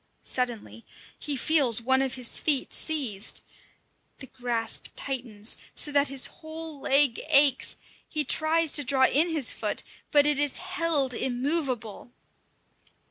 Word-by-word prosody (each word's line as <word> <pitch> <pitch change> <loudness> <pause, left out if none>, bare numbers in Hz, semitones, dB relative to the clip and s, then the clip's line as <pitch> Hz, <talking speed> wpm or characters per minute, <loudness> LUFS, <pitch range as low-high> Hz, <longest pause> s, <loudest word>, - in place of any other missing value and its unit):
Suddenly 240 -2 0 0.4
he 295 -2 -3
feels 265 -5 +2
one 265 +3 +1
of 265 -1 -2
his 250 -2 -2
feet 290 -4 -1
seized. 255 -11 0 0.8
The 265 - -10
grasp 240 -3 -2
tightens, 240 -5 -4 0.2
so 295 - +4
that 285 0 +2
his 270 -1 +1
whole 315 -2 -9
leg 275 -3 +4
aches; 275 -2 +4 0.3
he 305 -1 -1
tries 320 +1 +1
to 290 - +2
draw 265 0 +3
in 310 +6 +2
his 310 -6 0
foot, - - -2 0.3
but 290 -1 +4
it 295 -1 +3
is 290 -2 +1
held 330 -7 -2
immovable. 250 -3 -3
275 Hz, 135 wpm, -26 LUFS, 245-305 Hz, 0.8 s, so